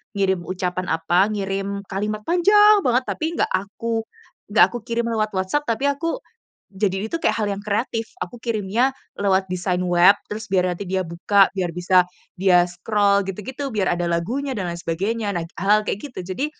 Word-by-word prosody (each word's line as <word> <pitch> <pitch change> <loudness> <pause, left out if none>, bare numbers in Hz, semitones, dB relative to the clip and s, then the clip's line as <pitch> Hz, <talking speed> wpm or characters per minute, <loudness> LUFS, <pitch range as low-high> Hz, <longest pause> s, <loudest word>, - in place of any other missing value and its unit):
ngirim 190 -2 +1
ucapan 185 0 -3
apa, 175 +4 +2
ngirim 200 -1 -3
kalimat 210 +2 -2
panjang 415 - +5
banget, 250 +1 +3
tapi 315 - -3
nggak - - 0
aku 225 +4 -2 0.5
nggak - - +8
aku 240 - -4
kirim 235 0 -1
lewat 215 -1 0
WhatsApp, 190 +11 -1
tapi 230 +3 -1
aku 330 - -3 0.5
jadi 195 0 -1
ini - - -3
tuh 335 - -2
kayak - - +1
hal 215 - 0
yang 195 - -6
kreatif 220 +2 -2
aku 245 -1 -7
kirimnya 230 +3 0 0.3
lewat 195 -1 +2
design 180 0 -1
web 175 +2 +5
terus 220 0 -6
biar 185 -1 +2
nanti 175 - -6
dia 190 0 0
buka, 190 +4 +3
biar 185 -3 -1
bisa 180 +2 +3 0.3
dia 180 -2 +4
scroll, 200 +3 +1
gitu-gitu 260 +9 -5
biar 205 -7 0
ada 175 0 -2
lagunya 245 +11 -2
dan 190 - -2
lain 170 0 -5
sebagainya. 200 +5 -2
Nah, 165 - -3 0.2
hal-hal 210 +2 +3
kayak 205 - -3
gitu, 245 - -9
jadi 275 +10 -1
200 Hz, 180 wpm, -22 LUFS, 185-230 Hz, 0.5 s, nggak